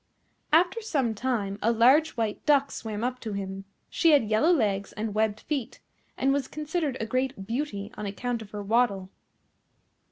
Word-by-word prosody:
After 350 +8 +3
some 275 - 0
time 210 -4 -2
a 230 - +3
large 255 +7 +4
White 220 -2 -2
Duck 280 -2 +4
swam 220 -1 -5
up 250 +1 -2
to 220 -4 -5
him. 195 0 -5 0.2
She 330 -2 +3
had 280 -6 +5
yellow 260 +11 +4
legs, 205 - +1
and 215 -1 -3
webbed 215 0 0
feet, 280 -6 -4 0.4
and 270 +1 +2
was 280 -2 -1
considered 305 -2 -2
a 225 - -2
great 255 -3 -2
beauty 225 -3 -3
on 210 - -5
account 235 +4 -3
of 215 - -10
her 205 -1 -6
waddle. 200 -3 +1
230 Hz, 170 wpm, -27 LUFS, 210-280 Hz, 0.4 s, had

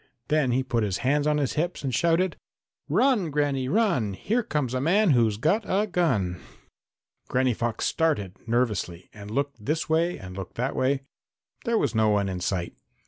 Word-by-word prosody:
Then 150 -4 +2
he 130 +2 +1
put 120 -3 0
his 100 -3 -1
hands 145 +2 +2
on 150 0 +2
his 140 -4 0
hips 170 0 -2
and 135 -2 -2
shouted: 170 +6 +2 0.5
"Run, 245 -11 +3
Granny, 140 -3 0
run! 170 - +1
Here 225 - 0
comes 150 - -2
a 130 - 0
man 185 +5 +3
who's 115 -5 +3
got 160 - +2
a 200 +3 +2
gun!" 125 - 0 0.9
Granny 130 -1 +2
Fox 115 0 -2
started 105 - 0
nervously 105 -7 -1
and 105 -1 -10
looked 140 -1 -2
this 155 +7 -1
way 165 +2 +2
and 90 -1 -9
looked 95 -2 -7
that 125 +4 -2
way. 135 +1 +1 0.6
There 235 -1 +2
was - - 0
no 110 -1 +3
one 100 -2 +1
in 90 -1 -3
sight. 90 -1 -2
130 Hz, 180 wpm, -26 LUFS, 110-165 Hz, 0.9 s, Run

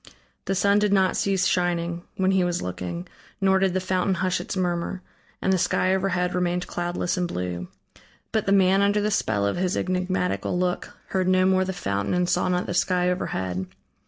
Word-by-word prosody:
The 195 - 0
sun 200 +2 +3
did 210 -1 +1
not 190 -2 +3
cease 190 -2 +1
shining, 175 -1 0 0.2
when 190 0 +2
he 190 -1 +3
was 175 0 -1
looking, 90 -1 -5 0.3
nor 190 -1 +3
did 190 -1 +1
the - - +2
fountain 185 +1 0
hush 185 +1 0
its - - -5
murmur, 180 0 -2 0.4
and 190 - +3
the 185 - +2
sky 185 +2 +2
overhead 185 -2 0
remained 180 0 0
cloudless 175 +1 -2
and 180 -1 0
blue. 90 - -4 0.6
But 220 -2 0
the - - +2
man 195 0 +4
under 200 +1 +3
the 210 +1 0
spell 105 - +1
of 100 - 0
his 185 +1 0
enigmatical 180 0 -1
look 180 0 -2
heard 185 -1 0
no 185 0 +4
more 185 0 +3
the 190 - -2
fountain 100 - -2
and 180 0 +1
saw 185 - +1
not 180 0 0
the - - -3
sky 180 0 +2
overhead. 95 - -3
180 Hz, 195 wpm, -25 LUFS, 175-190 Hz, 0.6 s, man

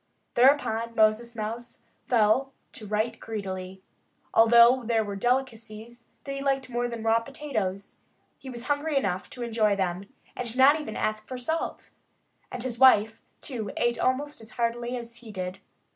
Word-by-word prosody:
Thereupon 235 -3 +3
Moses 220 +2 +2
Mouse 230 +2 -5 0.3
fell 240 +3 +2 0.2
to 215 - -10
right 215 +3 -1
greedily. 190 -3 -6 0.5
Although 235 +3 +6
there 225 -1 +1
were 205 -1 -5
delicacies 235 0 -3 0.2
that 275 - -6
he 275 0 -4
liked 270 -2 -1
more 240 0 0
than 235 -2 -6
raw 225 0 +3
potatoes, 230 -7 -4 0.4
he 265 - -9
was 240 -2 -7
hungry 290 +2 0
enough 185 -7 -1
to 245 - -7
enjoy 220 -3 +1
them 190 +2 -3 0.2
and 245 -1 -1
not 285 +4 +6
even 220 -7 -7
ask 215 0 -2
for 255 - -6
salt. 320 +7 -3 0.6
And 245 - -4
his 240 -2 -4
wife, 225 -4 +5 0.2
too, 230 -7 -4
ate 240 0 +1
almost 280 +1 -1
as 220 - -11
heartily 240 +1 -1
as 235 -1 -8
he 235 -2 -12
did. 185 -1 -5
235 Hz, 160 wpm, -27 LUFS, 215-255 Hz, 0.6 s, Although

